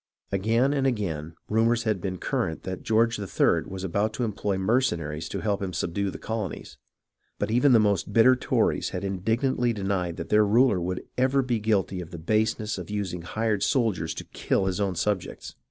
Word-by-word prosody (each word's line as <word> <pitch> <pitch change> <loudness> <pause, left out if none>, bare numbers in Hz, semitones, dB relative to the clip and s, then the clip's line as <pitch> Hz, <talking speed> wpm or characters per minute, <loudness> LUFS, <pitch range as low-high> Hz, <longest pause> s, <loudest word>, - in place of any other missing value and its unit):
Again 115 +8 +2
and 135 -2 +1
again 85 - -2
rumours 115 +2 +2
had 110 -5 0
been 95 -1 -3
current 80 -2 -2
that 95 -1 -5
George 115 +1 +2
III. 100 -2 +1
was 95 0 -6
about 100 +4 0
to 125 - -2
employ 105 -3 -1
mercenaries 85 - 0
to - - -4
help 100 -2 -1
him 95 -2 -3
subdue 100 +4 -1
the - - -6
colonies, 110 -4 -5 0.6
but - - -2
even 125 +4 +4
the 120 - +7
most 100 -1 +1
bitter 115 +4 +6
Tories 125 - 0
had 90 - -5
indig 100 +4 -1
nantly 125 -3 +1
denied 95 -4 -2
that 85 -2 -6
their 105 0 +5
ruler 110 -2 +3
would 90 +1 -3 0.2
ever 135 +1 +3
be 120 -3 0
guilty 100 -4 0
of 85 - -9
the 85 - -8
INDEPENDENCE 80 +6 -6
87 110 0 +5
baseness 105 -2 -4
of 90 - -8
using 100 -4 -3
hired 105 +4 -1
soldiers 110 - 0
to - - -6
kill 95 - -1
his 95 0 -1
own 95 -2 0
subjects. 95 +2 -2
105 Hz, 200 wpm, -26 LUFS, 90-115 Hz, 0.6 s, the